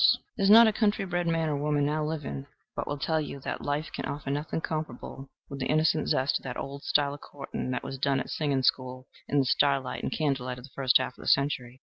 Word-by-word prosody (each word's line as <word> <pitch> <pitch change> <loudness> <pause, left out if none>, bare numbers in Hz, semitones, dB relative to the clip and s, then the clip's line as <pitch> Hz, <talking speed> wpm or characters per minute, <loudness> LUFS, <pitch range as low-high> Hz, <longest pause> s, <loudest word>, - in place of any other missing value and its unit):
There 200 - -2
is 195 - +4
not 230 +3 +10
a 220 - +3
country 205 -2 +1
bred 175 -1 -1
man 165 -1 +1
or 150 - 0
woman 145 0 +1
now 155 +1 0
living 145 - -4 0.3
but - - -3
will 145 - -2
tell 160 +2 0
you 140 -1 -6
that - - -4
life 145 +2 -2
can - - -4
offer 140 -1 -4
nothing 150 +3 -2
comparable 155 -4 -5 0.2
with 140 - -7
the 130 - -1
innocent 155 +1 +2
zest 130 +2 +2
of - - -22
that 125 -2 -5
old 140 +1 -6
style 145 -1 +2
of 145 - -10
courting 140 -2 -6
that 125 - -2
was 135 - -6
done 135 0 +2
at 130 - -5
singing 140 -4 0
school 130 0 0 0.2
in 145 - 0
the 135 - +4
starlight 135 -1 +1
and - - -3
candlelight 135 -5 -1
of 125 - -11
the 135 - -13
first 130 -2 +4
half 125 - -4
of - - -10
our - - -8
century. 130 -3 +1
140 Hz, 250 wpm, -28 LUFS, 130-155 Hz, 0.3 s, not